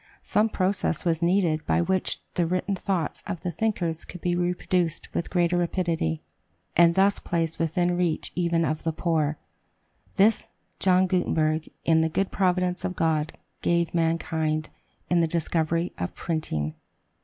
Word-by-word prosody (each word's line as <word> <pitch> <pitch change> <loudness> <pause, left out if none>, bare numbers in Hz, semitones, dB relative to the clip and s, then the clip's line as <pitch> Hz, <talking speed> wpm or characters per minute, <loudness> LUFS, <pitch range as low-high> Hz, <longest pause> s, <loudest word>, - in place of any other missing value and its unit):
Some 215 +2 +2
process 185 -5 0
was 165 -1 +1
needed 170 -3 +2
by - - +3
which 185 +2 0
the 175 -2 +1
written 185 +3 -1
thoughts 185 -4 -2
of 170 - -4
the 180 - -2
thinkers 175 -6 -1
could 180 - -9
be 175 +1 0
reproduced 175 -1 0
with 170 - -2
greater 175 -1 +2
rapidity, 170 - -1 0.5
and 170 0 +6
thus 195 +1 +3
placed 165 -1 -2
within 165 +2 +1
the - - +1
reach 175 -3 0
even 170 -2 +1
of 155 0 -1
the 160 - -1
poor. 155 -3 0 0.8
This, 210 +3 +3 0.3
John 185 0 +4
Gutenberg, 160 -4 0 0.2
in 160 -1 +4
the 160 - +1
good 195 +4 -1
providence 180 -1 +1
of 185 - -2
God, 155 -2 0 0.3
gave 170 -1 +1
mankind, 160 -2 0 0.4
in 175 - +4
the 165 - +3
discovery 165 +1 0
of 90 - -3
printing. 80 - -2
170 Hz, 155 wpm, -26 LUFS, 160-180 Hz, 0.8 s, and